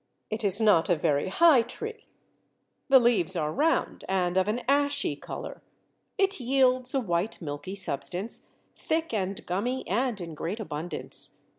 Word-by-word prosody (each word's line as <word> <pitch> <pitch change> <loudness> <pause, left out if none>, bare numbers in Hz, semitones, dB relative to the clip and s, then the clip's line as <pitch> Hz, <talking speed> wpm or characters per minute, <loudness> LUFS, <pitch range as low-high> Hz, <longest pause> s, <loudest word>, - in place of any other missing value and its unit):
It 215 +1 -3
is 200 0 +3
not 210 -7 +4
a 175 - +4
very 145 -1 0
high 300 - +5
tree: 445 - -8 0.8
the 270 - +8
leaves 220 -8 +2
are 155 -2 -1
round 320 +3 0
and 180 -2 0
of 190 +1 +2
an 225 +4 -1
ashy 285 - +2
colour: - - -8 0.6
it 390 -2 +2
yields 255 0 +2
a - - +3
white 180 -2 -2
milky 145 +4 -6
substance, 180 +4 0 0.3
thick 320 -3 -2
and 195 -2 -3
gummy 240 +9 -2
and 235 +2 -1
in 170 -2 -7
great 170 +8 -4
abundance. 175 -4 -3
210 Hz, 150 wpm, -27 LUFS, 175-260 Hz, 0.8 s, the